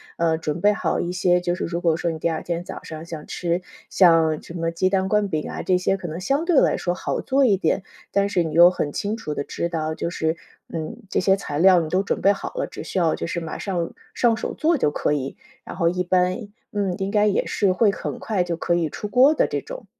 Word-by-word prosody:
呃， 165 -1 +1
准 160 0 -3
备 205 - +5
好 185 -6 -1
一 175 - -2
些 180 -1 +2
就 175 0 0
是 180 - -3
如 170 0 -3
果 165 -3 +2
说 175 - -1
你 160 - -5
第 165 - 0
二 160 - -2
天 170 0 -3
早 - - -8
上 160 0 -8
想 160 -3 -8
吃 175 0 -1 0.3
像 165 -4 +4
什 - - -11
么 165 -1 -2
鸡 170 +3 +1
蛋 190 0 0
灌 210 0 +2
饼 155 -5 -3
啊， - - -4
这 185 - +2
些 190 +1 +1
可 185 - -6
能 160 0 -5
相 275 - 0
对 340 -5 +4
来 - - +2
说 175 - -1
好 180 - -3
做 275 +1 +2
一 205 -6 +4
点。 185 +2 0 0.3
但 200 0 +2
是 180 -4 +1
你 160 -2 -4
又 170 +2 +8
很 155 - -2
清 210 +2 -2
楚 155 -9 -5
地 140 - -3
知 170 - -3
道， 160 -2 -2
就 170 - -3
是 160 -1 -1 0.4
嗯， 160 +6 -4
这 - - +1
些 190 +1 +4
材 150 -7 -4
料 185 0 +6
你 160 - -4
都 185 +3 +2
准 - - -2
备 200 - +5
好 200 - -4
了， - - -2
只 - - -8
需 - - -4
要 165 -3 +2
就 - - -4
是 170 - -3
马 160 -1 -5
上 175 -4 -2 0.2
上 230 -2 +2
手 - - -4
做 320 +1 +2
就 150 - +2
可 150 - -1
以， 140 -2 -2 0.3
然 - - -7
后 170 - +2
一 180 +1 -1
般， 185 +4 +1 0.2
嗯， 200 -3 -1
应 195 +1 -2
该 210 0 +3
也 205 - +1
是 200 -2 +1
会 205 +3 +3
很 - - -5
快 205 -5 0
就 175 -1 -2
可 175 0 0
以 165 -2 0
出 210 - -5
锅 255 +7 +5
的 - - +2
这 - - -2
种。 - - -9
180 Hz, 285 characters per minute, -23 LUFS, 165-200 Hz, 0.4 s, 又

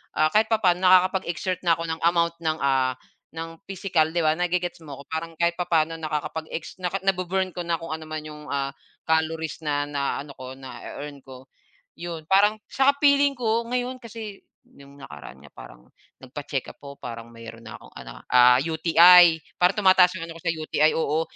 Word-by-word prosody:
kahit 155 +9 +3
papaano 190 -5 +2
nakakapag-exert 185 -1 +2
na 165 -2 +3
ako 165 - -5
ng 160 - -5
amount 170 0 +2
ng 160 0 0
ah, 130 -2 +1 0.4
ng 165 0 -7
physical, 185 -5 0
'di 170 - +2
ba? 155 - +4
Nag-ge-gets 180 0 -1
mo 140 - -8
ako? 140 - -10
Parang 165 +1 -4
kahit 170 0 +1
papaano 165 -2 0
nakakapag 155 0 -4
ex 160 - -6
naka 180 +1 -2
na-bu-burn 190 0 0
ko - - -6
na 170 - 0
kung 165 -1 -8
ano 160 0 -7
naman 155 -1 -5
'yong 150 -1 -10
ah, 140 -1 -2 0.3
calories 160 -1 -1
na 145 -1 0
na 140 -1 -2
ano 145 - -12
ko 130 0 -8
na 130 -1 -10
e-earn 145 0 -8
ko. 130 -1 -12 0.6
Yon 165 -2 -7
parang 205 +3 +4
'tsaka 280 +1 +2
feeling 280 -1 +4
ko 230 -1 0
ngayon 250 +1 -2
kasi 220 -3 -9 0.2
'yong 140 0 -17
nakaraan 70 - -11
nga, 75 - -15
parang - - -13 0.4
nagpa-check-up 135 +1 -6
po, 140 0 -10
parang 115 -1 -8
mayroon 115 0 -11
na 110 -1 -9
akong - - -18
ano - - -10 0.2
ah, 125 0 +6
UTI. 165 +1 +6 0.2
Parang 180 +3 +3
tumataas 185 -1 +6
ang 165 - -6
ano 165 - -9
ko - - -17
sa 170 - +1
UTI 155 -1 +1
oo. 155 0 0
160 Hz, 185 wpm, -24 LUFS, 140-180 Hz, 0.6 s, ah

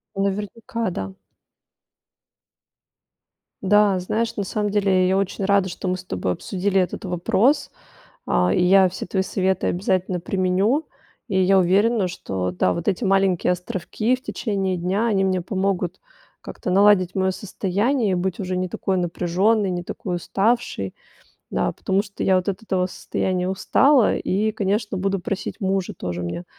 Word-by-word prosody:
Наверняка, 210 +4 -2
да. 95 - -5 2.5
Да, 200 -1 +4
знаешь, 225 +5 -2
на 205 - -2
самом 210 +1 -2
деле, 195 -3 +2
я 190 - +2
очень 195 0 -1
рада, 200 -2 +3
что 185 - -6
мы 185 0 0
с 185 - -10
тобой 90 - -2
обсудили 195 - 0
этот 180 +4 -4
вопрос. 195 - +1 0.6
А, - - +2
и 180 - +2
я 190 +1 +6
все 180 - -6
твои 190 +1 0
советы 190 -1 0
обязательно 185 -1 0
применю. 195 - +1 0.4
И 190 -3 +1
я 190 +1 +4
уверена, 200 +3 +3
что, 95 - -3
да, 90 +1 +1
вот 170 - -4
эти 195 +3 0
маленькие 195 -2 +2
островки 185 +6 -2
в 255 - -6
течение 195 -5 -2
дня, 190 +6 0
они 195 -4 +2
мне 185 -1 +1
помогут 190 -1 -2 0.4
как-то 180 - -6
наладить 195 -1 +4
моё 190 -1 +1
состояние. 205 +4 0
Быть 180 0 -2
уже 185 -2 -3
не 185 0 -1
такой 190 +2 -2
напряжённой, 185 +4 +1
не 175 -1 -2
такой 180 0 -4
уставшей, 195 - -1 0.6
да, - - 0
потому 195 +1 0
что 200 -1 -8
я 190 -1 +4
вот 185 +2 -1
от 200 +3 -3
этого 185 -4 0
состояния 185 0 -2
устала. 255 +6 +3
И, 215 +3 0
конечно, 205 0 -1
буду 195 +1 0
просить 195 +5 -4
мужа 190 -1 -1
тоже 90 0 -4
мне, 85 - -4
190 Hz, 155 wpm, -22 LUFS, 180-205 Hz, 2.5 s, я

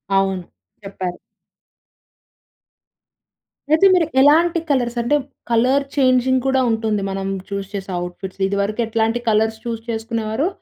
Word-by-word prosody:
అవును. 195 -1 +1 0.4
చెప్పారు. 185 -2 -5 2.5
అయితే 315 +5 +5
మీరు 355 -3 +4 0.2
ఎలాంటి 330 +4 +4
కలర్స్? 245 -4 0
అంటే 240 +5 +1 0.4
కలర్ 255 +5 +3
చేంజింగ్ 260 -1 +3
కూడా 265 0 +2
ఉంటుంది. 220 -2 0
మనం 195 0 -3 0.2
చూస్ 200 -1 -4
చేసే 195 -1 -5
అవుట్‌ఫిట్స్. 180 +2 -7
ఇది 200 - -2
వరకు 210 +3 -3
ఎట్లాంటి 225 +1 0
కలర్స్ 220 +1 +2
చూస్ 230 -1 -3
చేసుకునేవారో, 225 +4 -2
225 Hz, 120 wpm, -20 LUFS, 200-260 Hz, 2.5 s, అయితే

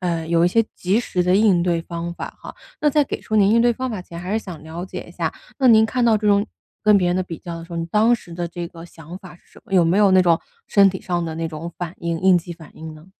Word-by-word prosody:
呃 170 -3 -2
有 170 0 +2
一 - - +4
些 225 +5 +2
及 190 +4 0
时 185 -6 -1
的 180 +1 +3
应 200 -5 +4
对 170 -1 0
方 170 0 -5
法 - - -7
哈， - - -9 0.3
那 300 - +3
在 295 +1 +3
给 - - -5
出 215 - -2
您 200 -1 +4
应 230 +2 +4
对 240 0 +4
方 260 +3 -4
法 215 -5 -4
前 170 -1 -10
还 180 +3 -5
是 220 - +1
想 170 -6 -9
了 160 +3 -7
解 190 - -7
一 - - -12
下， - - -2 0.3
那 265 -2 +4
您 220 -2 +7
看 250 +2 -1
到 230 -2 +4
这 210 - -3
种 200 0 +4 0.4
跟 210 -1 +5
别 180 - +1
人 175 - +1
的 185 - 0
比 170 -3 -8
较 170 -1 -7
的 165 - -9
时 170 - -13
候， - - -4
你 165 - -2
当 215 +7 +3
时 180 -7 -9
的 175 0 -3
这 175 0 -6
个 165 0 -12
想 165 0 -11
法 185 -2 -13
是 - - -31
什 - - -16
么？ - - -16
有 180 -2 +5
没 165 +3 +2
有 205 -2 +5
那 185 0 +6
种 170 -2 +3 0.3
身 200 -2 +5
体 190 - -7
上 175 -1 -2
的 160 -1 -5
那 165 0 -2
种 160 +1 -7
反 175 -1 -5
应 170 -1 -3
应 190 -1 +6
激 175 +1 -8
反 165 -2 -14
应 160 0 -9
呢？ 155 +2 -15
180 Hz, 330 characters per minute, -21 LUFS, 170-205 Hz, 0.4 s, 您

